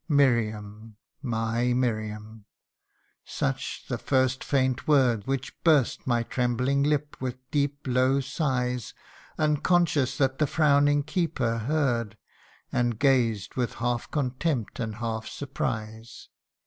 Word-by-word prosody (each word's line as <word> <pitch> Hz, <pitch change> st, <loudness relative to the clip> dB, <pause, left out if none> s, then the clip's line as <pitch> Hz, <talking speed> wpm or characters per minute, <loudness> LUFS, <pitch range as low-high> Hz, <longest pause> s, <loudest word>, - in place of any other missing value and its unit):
' -, -, -49 dB
Miriam! 110 Hz, -6 st, +1 dB, 0.3 s
my 120 Hz, -1 st, 0 dB
Miriam 110 Hz, -3 st, -3 dB, 0.4 s
!' -, -, -44 dB
Such -, -, -3 dB
the -, -, -3 dB
first 130 Hz, -1 st, +1 dB
faint 130 Hz, -3 st, 0 dB
word 125 Hz, -8 st, +3 dB
Which 135 Hz, -1 st, -2 dB
burst 150 Hz, -8 st, +3 dB
my 120 Hz, -2 st, +2 dB
trembling 125 Hz, +3 st, 0 dB
lip 145 Hz, 0 st, 0 dB
with 130 Hz, -1 st, -3 dB
deep 145 Hz, -1 st, 0 dB
low 130 Hz, +1 st, +2 dB
sighs, 125 Hz, -, -2 dB, 0.4 s
Unconscious 155 Hz, -2 st, +2 dB
that 135 Hz, -1 st, +1 dB
the 150 Hz, -, +3 dB
frowning 145 Hz, -1 st, +3 dB
keeper 140 Hz, -8 st, -1 dB
heard, 120 Hz, -5 st, 0 dB, 0.5 s
And 120 Hz, -2 st, 0 dB
gazed 120 Hz, -6 st, +2 dB
with 125 Hz, -2 st, -2 dB
half 120 Hz, 0 st, -2 dB
contempt, 135 Hz, -3 st, -2 dB
and 110 Hz, -3 st, -3 dB
half 110 Hz, -1 st, -4 dB
surprise. 110 Hz, -5 st, -5 dB
125 Hz, 120 wpm, -27 LUFS, 115-140 Hz, 0.5 s, word